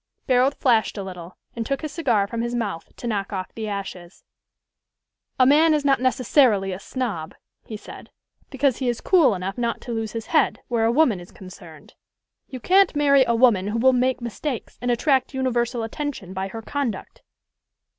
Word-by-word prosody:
Barold 260 +1 +3
flashed 230 -5 +1
a 200 - -4
little, 180 -2 -9 0.2
and 230 - -2
took 275 +6 -3
his 305 - -4
cigar 245 - +1
from 230 +3 -4
his 240 +1 -2
mouth 165 -9 -4
to - - -10
knock 205 -4 -2
off 185 -2 -5
the 220 -1 -5
ashes. 195 -3 -7 1.2
"A 255 - +6
man 305 +4 +5
is 295 -1 -2
not 275 -3 +3
necessarily 255 -6 +2
a 185 - -6
snob," 210 -11 -4 0.3
he 215 - -6
said, - - -12 0.4
"because 270 -2 +1
he 255 -2 -1
is 240 - -2
cool 310 - +4
enough 190 +5 -5
not 235 -1 -1
to 245 - -7
lose 225 -1 -3
his 230 -1 -5
head - - +3
where 230 -2 +1
a 225 - +3
woman 245 - +3
is 175 - -13
concerned. 170 -5 -13 0.5
You 260 - -8
can't 375 +5 +3
marry 280 -2 +5
a 235 - +2
woman 225 -6 +3
who 210 +2 -2
will 260 +3 +4
make 255 0 +1
mistakes, 240 +2 -5
and 245 - -2
attract 265 +2 +1
universal 245 -2 -1
attention 225 -5 -5
by 190 0 -3
her 225 +3 -8
conduct." 245 -6 -4
235 Hz, 185 wpm, -23 LUFS, 200-265 Hz, 1.2 s, A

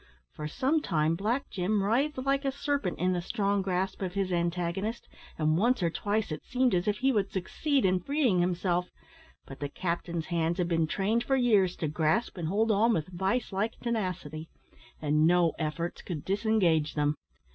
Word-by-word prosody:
For 150 - -5
some 270 - +1
time 160 - +1
Black 225 +10 -1
Jim 200 +2 0
writhed 265 +9 +1
like 275 +1 +1
a 270 - 0
serpent 280 -8 -2
in 185 +1 +1
the 175 - -1
strong 200 +1 0
grasp 190 0 -2
of 185 -1 -3
his 195 -2 0
antagonist, 175 +5 -2 0.3
and 155 +1 +2
once 235 -1 +2
or 170 - +2
twice 205 +1 -1
it 155 - -5
seemed 255 -2 +1
as 180 +1 +1
if 210 0 +1
he 265 +3 +2
would 205 -5 +1
succeed 270 - 0
in 185 0 +3
freeing 260 - +1
himself, 180 0 0 0.6
but 135 - -10
the 145 - -3
captain's 170 0 -3
hands 170 0 0
had 180 -2 0
been 165 -2 +1
trained 210 +8 0
for 270 - +1
years 210 -8 +3
to 160 - -2
grasp 155 +9 0
and 170 -4 -3
hold 220 +6 +2
on 225 +3 +3
with 160 -2 -1
vice 190 +8 -1
like 210 +4 -1
tenacity, 180 -9 -3 0.5
and 150 +1 +3
no 175 -1 +4
efforts 165 +2 -3
could 160 -6 -6
disengage 190 -7 +2
them. 150 -1 +2
185 Hz, 185 wpm, -29 LUFS, 170-220 Hz, 0.6 s, no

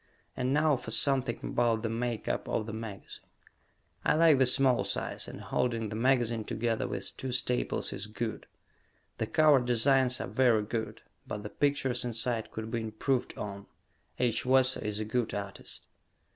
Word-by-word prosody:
And 125 0 -1
now 150 0 +3
for 125 - -8
something 130 -5 +1
about 115 -2 +1
the 115 - 0
make 115 -1 -3
up - - -2
of 110 - 0
the 110 - -6
magazine. 110 -3 -8 0.8
I - - +3
like 160 -3 +5
the 130 - +5
small 130 -1 +4
size, - - -2
and - - -8
holding 115 -3 -1
the 105 - -5
magazine 120 -2 +2
together 115 +1 -1
with - - -3
two 130 - -4
staples 125 0 -1
is 100 +1 -2
good. 110 +1 -4 0.7
The - - -1
cover 155 -3 +5
designs 125 +1 +3
are - - -3
very 120 -5 +3
good, 110 +1 -4 0.2
but 105 - -5
the 105 - -5
pictures 140 -3 0
inside 115 -1 -1
could 110 0 -6
be 120 -1 -1
improved 110 +4 -1
on. 100 -1 -6 0.5
H. 120 -3 +1
Wesso 130 0 +4
is 105 0 -3
a 110 - -2
good 120 +1 -1
artist. 100 -1 -6
120 Hz, 170 wpm, -30 LUFS, 110-130 Hz, 0.8 s, like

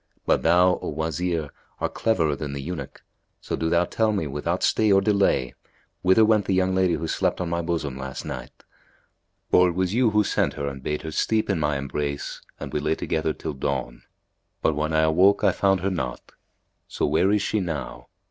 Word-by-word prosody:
But - - +2
thou, 90 +2 +4
O - - -4
Wazir, 80 0 -2 0.3
art - - -2
cleverer 80 -10 +1
than 70 0 -5
the 70 - -4
eunuch, 85 +5 -6 0.4
so - - -4
do 80 - -1
thou 85 +1 +3
tell 110 +4 +1
me 100 -6 -1
without 75 +5 -2
stay 110 -2 +3
or 95 - +6
delay, 100 - +1 0.5
whither 95 +5 +5
went 105 -2 +3
the 95 - +1
young 95 0 +2
lady 95 -2 +2
who 80 +2 -4
slept - - 0
on 90 -2 -2
my 85 0 0
bosom 80 -6 -3
last 65 -1 -6
night; 60 -1 -8 0.9
for 90 0 +5
it - - -3
was 95 +1 0
you 120 0 +3
who 105 0 +3
sent - - 0
her 70 - -4
and 70 -1 -6
bade 75 +3 -3
her 80 - -5
steep 110 +7 +1
in - - 0
my 75 -2 0
embrace 70 +1 -4 0.2
and - - -7
we - - 0
lay - - 0
together 80 0 -1
till 80 0 -5
dawn; 65 -3 -3 0.6
but, 80 - +2
when 75 +1 -1
I 80 0 +3
awoke, 90 +6 +4
I - - +5
found 95 -2 +1
her 100 +2 0
not. 65 -8 -4 0.6
So - - -2
where 80 +7 +2
is 105 -1 +2
she 110 - 0
now?" 75 -10 -5
85 Hz, 205 wpm, -24 LUFS, 75-95 Hz, 0.9 s, or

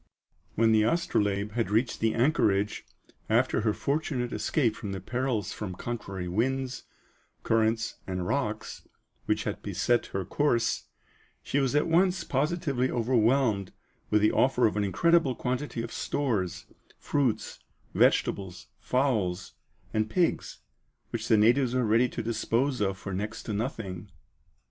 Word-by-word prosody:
When 115 0 +4
the 110 -1 +5
Astrolabe 105 -6 +1
had 115 -3 -1
reached 110 +3 +1
the 110 0 +1
anchorage, 105 -6 +1 0.4
after - - +2
her 110 0 +2
fortunate 135 -1 -2
escape 120 -8 +1
from 100 -4 -5
the 95 - -4
perils 120 0 -2
from 95 -4 -5
contrary 100 -5 -5
winds, 130 +7 -1 0.6
currents, 110 0 +1
and 90 -1 -3
rocks, 110 -1 -3 0.4
which - - +1
had - - -4
beset 120 0 0
her 95 -1 -3
course, 120 -3 0 0.6
she 145 - 0
was 135 0 +1
at 150 - +3
once 180 +2 +2
positively 140 -2 0
overwhelmed 115 -4 +1 0.4
with 105 0 +3
the 105 - +5
offer 130 -1 +3
of 105 - +1
an 105 - +1
incredible 155 - +3
quantity 125 -1 -3
of 115 - -7
stores, 110 -11 -2 0.3
fruits, 135 -6 -1 0.3
vegetables, 90 -10 +1
fowls, 110 -9 0 0.4
and 110 0 0
pigs, 175 +4 0 0.5
which 115 -1 -3
the 110 - +5
natives 120 +4 +3
were 125 -2 +2
ready 115 +3 +3
to 115 - -5
dispose 115 +3 0
of 95 -1 0
for 100 0 -6
next 105 +4 -4
to 110 - -4
nothing. 105 -4 -4
115 Hz, 140 wpm, -28 LUFS, 105-130 Hz, 0.6 s, the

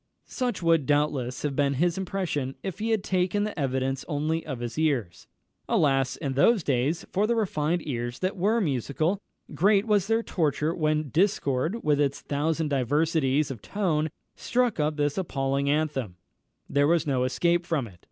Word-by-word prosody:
Such 245 -8 -3
would, 165 -4 +3
doubtless, 145 -4 0
have 145 -2 -1
been 140 -1 +1
his 170 +5 +1
impression 180 -8 -2
if 190 0 -5
he 220 +2 -1
had 220 -3 +1
taken 185 +2 +1
the 210 -5 -4
evidence 135 -1 -1
only 155 +1 -1
of 130 -5 -5
his 120 +4 -4
ears. 135 - -1 0.4
Alas, 135 -3 +2
in 140 -4 -3
those 190 - +4
days 145 +6 0
for 205 +3 +1
the 235 - +1
refined 175 -6 0
ears 120 -2 -3
that 185 +1 -2
were 205 +5 +2
musical! 155 - 0 0.3
great 200 +3 +3
was 205 -4 +2
their 225 +1 +1
torture 155 -3 0
when 155 -3 0
discord, 170 - 0
with 150 -1 +2
its 140 -1 0
thousand 155 +2 -1
diversities 145 +1 +1
of 120 -6 -7
tone, 160 -7 0 0.3
struck 245 -6 0
up 150 0 0
this 145 +3 0
appalling 140 -5 -1
anthem 145 - -1 0.5
there 145 0 +2
was 170 0 +2
no 130 -4 +1
escape 170 +8 +1
from 155 -7 0
it. 95 -6 -14
150 Hz, 170 wpm, -26 LUFS, 135-180 Hz, 0.5 s, those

